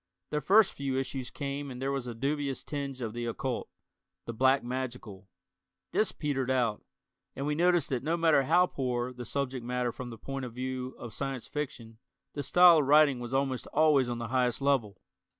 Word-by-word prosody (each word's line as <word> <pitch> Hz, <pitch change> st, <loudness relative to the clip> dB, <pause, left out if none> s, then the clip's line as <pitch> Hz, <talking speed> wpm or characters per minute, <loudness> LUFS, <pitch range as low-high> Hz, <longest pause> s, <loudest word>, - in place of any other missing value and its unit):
The 150 Hz, -, 0 dB
first 200 Hz, +7 st, +5 dB
few 135 Hz, -2 st, -2 dB
issues 130 Hz, -1 st, -3 dB
came 140 Hz, 0 st, -4 dB
and 125 Hz, -1 st, -7 dB
there 135 Hz, +1 st, -1 dB
was 135 Hz, -3 st, -3 dB
a 120 Hz, -, -5 dB
dubious 140 Hz, +2 st, -2 dB
tinge 140 Hz, -3 st, -5 dB
of 110 Hz, -2 st, -3 dB
the 120 Hz, 0 st, -4 dB
occult, 125 Hz, +2 st, -3 dB, 0.6 s
the 115 Hz, -, -5 dB
"black 130 Hz, +3 st, +3 dB
magical." 120 Hz, -6 st, -5 dB, 0.6 s
This 215 Hz, -, +1 dB
petered 135 Hz, -4 st, -2 dB
out, 120 Hz, -5 st, +1 dB, 0.5 s
and 135 Hz, -, -3 dB
we 150 Hz, -, 0 dB
noticed 175 Hz, -1 st, +2 dB
that 130 Hz, -3 st, -1 dB
no 160 Hz, +4 st, 0 dB
matter 160 Hz, -4 st, +4 dB
how 170 Hz, +7 st, +4 dB
poor 125 Hz, -5 st, -2 dB
the 125 Hz, -1 st, -8 dB
subject 130 Hz, -1 st, -3 dB
matter 125 Hz, 0 st, -1 dB
from 125 Hz, +1 st, -7 dB
the 115 Hz, -, -8 dB
point 135 Hz, +2 st, -5 dB
of 120 Hz, -, -8 dB
view 130 Hz, 0 st, -4 dB
of 115 Hz, -2 st, -8 dB
Science 135 Hz, -2 st, -4 dB
Fiction, 125 Hz, -7 st, -6 dB, 0.3 s
the 145 Hz, -, -3 dB
style 175 Hz, +3 st, +7 dB
of 140 Hz, -, 0 dB
writing 145 Hz, -3 st, +5 dB
was 120 Hz, 0 st, -6 dB
almost 135 Hz, -1 st, -1 dB
always 145 Hz, -4 st, +3 dB
on 120 Hz, -, -2 dB
the 115 Hz, -1 st, -5 dB
highest 125 Hz, -1 st, +1 dB
level. 135 Hz, -7 st, +1 dB
130 Hz, 195 wpm, -30 LUFS, 125-145 Hz, 0.6 s, style